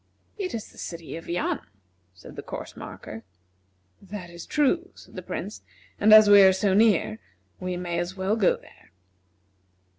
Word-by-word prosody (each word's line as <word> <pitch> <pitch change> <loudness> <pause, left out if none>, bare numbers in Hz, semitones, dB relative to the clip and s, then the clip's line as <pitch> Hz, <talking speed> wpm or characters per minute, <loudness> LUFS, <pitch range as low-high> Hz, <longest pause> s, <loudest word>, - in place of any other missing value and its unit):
"It 385 - -4
is 220 - -7
the - - -16
city 170 -2 -7
of 165 - -9
Yan," 175 +1 -1 0.6
said 85 - -13
the - - -6
course - - -8
marker. 110 - -9 0.8
"That 190 -3 -8
is 170 0 -10
true," 330 +5 +1
said - - -16
the - - -6
Prince; - - -6 0.4
"and 215 - +4
as 215 0 +9
we 205 -1 +8
are 190 -1 +7
so 190 +1 +1
near, 200 - +3 0.4
we 185 -1 -3
may 175 -1 -3
as 175 +2 -4
well 190 +3 0
go 215 -5 +3
there." - - -21
190 Hz, 170 wpm, -25 LUFS, 175-215 Hz, 0.8 s, as